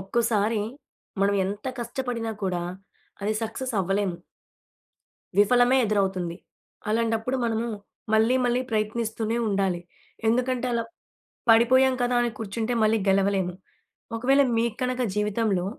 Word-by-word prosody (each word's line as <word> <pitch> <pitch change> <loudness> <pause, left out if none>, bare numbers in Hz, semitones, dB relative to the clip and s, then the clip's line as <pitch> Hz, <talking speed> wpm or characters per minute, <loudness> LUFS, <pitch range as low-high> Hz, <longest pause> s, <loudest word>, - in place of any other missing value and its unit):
ఒక్కోసారి 215 +1 +1 0.6
మనం 200 +1 +3
ఎంత 200 +5 -4
కష్టపడినా 235 -1 -3
కూడా 180 -2 -1 0.6
అది 215 +2 0
సక్సెస్ 235 +3 -4
అవ్వలేము. 195 -1 0 1.2
విఫలమే 245 +5 +5
ఎదురవుతుంది. 190 -5 0 0.5
అలాంటప్పుడు 225 +3 0
మనము 230 0 0 0.5
మళ్ళీ, 220 +3 +4
మళ్ళీ 245 0 +2
ప్రయత్నిస్తూనే 220 +1 -1
ఉండాలి. 195 -3 0 0.5
ఎందుకంటే, 250 +2 +1
అలా 230 -1 0 0.7
పడిపోయాం 255 +3 +5
కదా! 245 0 +1
అని 240 - 0
కూర్చుంటే 225 +2 -2
మళ్ళీ 220 +1 +3
గెలవలేము. 195 -2 +2 0.6
ఒకవేళ 270 +4 +4 0.2
మీకు 230 -1 0
కనుక 255 0 0
జీవితంలో 210 -2 0
225 Hz, 105 wpm, -25 LUFS, 200-240 Hz, 1.2 s, విఫలమే